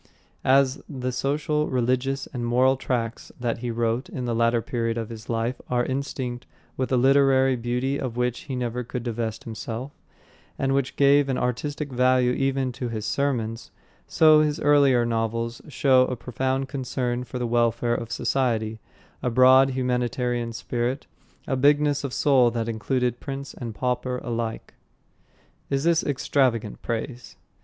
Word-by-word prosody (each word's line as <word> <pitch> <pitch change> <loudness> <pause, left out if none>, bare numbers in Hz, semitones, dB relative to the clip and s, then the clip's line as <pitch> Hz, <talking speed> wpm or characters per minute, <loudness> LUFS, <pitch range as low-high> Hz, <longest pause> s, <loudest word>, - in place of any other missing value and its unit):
As 135 0 +3
the 130 -3 -3
social, 150 +3 0
religious 130 +2 0
and 125 -2 -3
moral 125 +3 +3
tracts 120 -3 -3
that 120 -2 -2
he 120 0 -4
wrote 115 +1 -1
in 125 - -5
the 120 - -1
latter 115 +1 +2
period 115 0 -2
of 115 -2 -4
his 110 -1 -10
life 115 +2 -1
are 120 -1 +1
instinct 130 -2 -4 0.3
with 130 0 -2
a 130 - +3
literary 135 0 +4
beauty 125 +3 -1
of 125 -3 -4
which 125 -1 0
he 130 - -2
never 125 0 -2
could 120 +1 -5
divest 115 -2 -3
himself, 115 +4 -6 0.7
and 135 0 0
which 135 -1 0
gave 140 0 +4
an 130 - 0
artistic 145 +4 -2
value 125 0 +3
even 135 0 0
to 125 0 -5
his 110 -2 -4
sermons, 115 -3 -1 0.4
so 155 -1 +6
his 150 0 0
earlier 140 -4 +4
novels 115 0 -2
show 130 -2 +3
a 125 - -2
profound 130 +3 -2
concern 125 -2 -2
for 125 +1 -7
the 125 - -2
welfare 120 0 +1
of 115 0 -4
society, 115 -5 0 0.4
a 125 - 0
broad, 130 +2 +6
humanitarian 125 -2 -1
spirit, 120 +3 -3 0.4
a 135 - 0
bigness 145 +2 +3
of 140 - -3
soul 130 -3 +4
that 115 -1 -3
included 120 +2 -1
prince 140 0 -6
and 115 -3 -7
pauper 125 +1 -1
alike. 115 -2 -4 1.0
Is 135 0 0
this 170 0 +3
extravagant 130 -6 0
praise? 120 +2 -5
125 Hz, 155 wpm, -25 LUFS, 120-135 Hz, 1.0 s, so